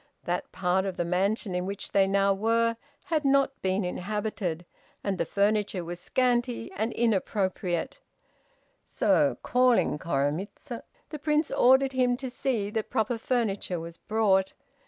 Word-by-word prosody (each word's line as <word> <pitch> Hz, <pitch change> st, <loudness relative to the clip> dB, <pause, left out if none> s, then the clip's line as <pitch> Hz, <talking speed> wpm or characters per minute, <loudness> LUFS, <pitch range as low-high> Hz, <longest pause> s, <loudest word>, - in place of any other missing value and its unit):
That 175 Hz, +1 st, -3 dB
part 185 Hz, +1 st, +1 dB
of 190 Hz, -, -4 dB
the 175 Hz, -, 0 dB
mansion 190 Hz, +3 st, 0 dB
in 180 Hz, +1 st, -1 dB
which 200 Hz, 0 st, -6 dB
they 195 Hz, -1 st, +4 dB
now 195 Hz, 0 st, +3 dB
were, 230 Hz, +3 st, +1 dB, 0.3 s
had 315 Hz, -2 st, 0 dB
not 275 Hz, -1 st, +2 dB
been 190 Hz, +1 st, 0 dB
inhabited, 185 Hz, -2 st, -3 dB, 0.4 s
and 195 Hz, -2 st, -2 dB
the -, -, 0 dB
furniture 200 Hz, -3 st, +1 dB
was 175 Hz, +1 st, -6 dB
scanty 245 Hz, +1 st, 0 dB
and 220 Hz, +3 st, -2 dB
inappropriate; 190 Hz, -5 st, -1 dB, 0.8 s
so, -, -, +2 dB
calling 250 Hz, -10 st, +3 dB
Koremitz, 165 Hz, -, -2 dB, 0.4 s
the 305 Hz, -, -5 dB
Prince 300 Hz, +1 st, +1 dB
ordered 265 Hz, +2 st, +5 dB
him 250 Hz, -1 st, +2 dB
to 260 Hz, -1 st, -5 dB
see 235 Hz, -6 st, -1 dB
that 220 Hz, 0 st, -2 dB
proper 225 Hz, +1 st, 0 dB
furniture 210 Hz, -7 st, -1 dB
was 165 Hz, 0 st, -8 dB
brought. 200 Hz, -3 st, +1 dB
205 Hz, 140 wpm, -28 LUFS, 185-245 Hz, 0.8 s, ordered